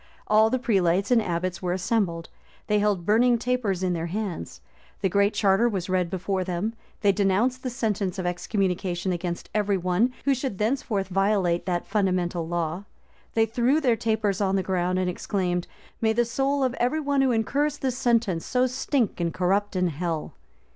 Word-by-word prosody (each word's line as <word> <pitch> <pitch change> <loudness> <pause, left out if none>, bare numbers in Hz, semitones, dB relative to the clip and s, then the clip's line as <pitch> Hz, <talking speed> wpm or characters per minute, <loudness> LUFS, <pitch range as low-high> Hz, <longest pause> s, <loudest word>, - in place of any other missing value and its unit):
All 215 +1 +4
the 255 - +1
prelates 195 -5 +1
and 240 -2 +5
abbots 180 -1 -2
were 180 -1 -1
assembled: 180 -3 -1 0.4
they 210 -1 +2
held 205 -4 0
burning 235 +4 +4
tapers 230 -6 -1
in 180 -1 +1
their 170 0 -2
hands: 185 - -4 0.4
the 190 - +2
Great 200 +2 +2
Charter 205 +4 +3
was 190 -4 -3
read 180 -2 +1
before 190 +1 -2
them: 185 +5 -2 0.3
they 205 -2 +5
denounced 205 +6 +1
the 255 - -3
sentence 210 -7 -2
of 185 - -3
excommunication 180 0 -1
against 175 -1 -4
every 205 -2 +1
one 185 +7 +1
who 280 - +4
should 260 -6 -3
thenceforth 215 -3 -1
violate 190 -3 +1
that 175 -1 -1
fundamental 180 -5 0
law: 175 +2 -2 0.5
they 225 0 +4
threw 240 +6 +2
their 250 -6 +2
tapers 220 -3 0
on 195 -1 +1
the 190 - +1
ground, 185 -1 0
and 185 0 0
exclaimed, 180 -1 -2 0.3
"May 220 -1 +3
the 240 +1 +2
soul 270 +3 0
of 255 -2 +1
every 250 +6 +1
one 285 -2 +1
who 265 - +3
incurs 285 +6 0
this 260 -3 -2
sentence 230 -9 +1
so 255 0 +1
stink 255 -3 -1
and 170 -1 0
corrupt 195 +4 0
in 180 -1 +2
hell!" 160 0 -3
200 Hz, 180 wpm, -25 LUFS, 180-235 Hz, 0.5 s, and